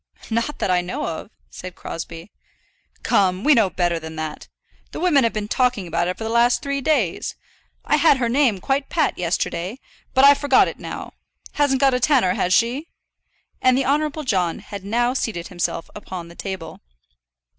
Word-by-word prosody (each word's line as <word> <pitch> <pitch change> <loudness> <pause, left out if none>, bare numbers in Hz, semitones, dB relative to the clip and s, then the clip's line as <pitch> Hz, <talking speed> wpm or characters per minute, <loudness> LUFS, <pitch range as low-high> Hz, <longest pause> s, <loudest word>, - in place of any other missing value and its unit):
"Not 230 +6 -1
that 185 - 0
I 180 -1 +3
know 180 +1 -4
of," 165 +4 -5 0.2
said 180 -1 -8
Crosbie. 165 +3 -7 0.7
"Come, 185 0 +2
we 300 - +6
know 225 -7 +4
better 175 -2 0
than 160 0 -8
that. 155 -1 -5 0.5
The - - -5
women 320 -6 +4
have 230 - +2
been 210 -1 -3
talking 250 -4 +1
about 175 0 -1
it 180 - -3
for - - -6
the 220 - -3
last 235 +1 +3
three 280 0 -2
days. 260 - 0 0.5
I - - +3
had 315 -4 +5
her 245 -2 0
name 240 -5 +2
quite 270 +4 -1
pat 330 - +1
yesterday, 175 +4 -2 0.4
but 265 +1 +7
I've 285 0 +7
forgot 285 -3 +4
it - - -6
now. - - -7 0.4
Hasn't 285 -3 +1
got 270 -1 +5
a 250 - +1
tanner; 250 -9 +3
has 180 - -1
she?" 240 - +2 0.7
And 255 0 +4
the 270 - +1
Honourable 300 +2 0
John 185 - 0
had 200 -2 -9
now 240 +5 +1
seated 205 -9 -3
himself 175 -2 -3
upon 185 -5 -7
the 170 - -13
table. 190 -4 -6
225 Hz, 185 wpm, -22 LUFS, 180-270 Hz, 0.7 s, but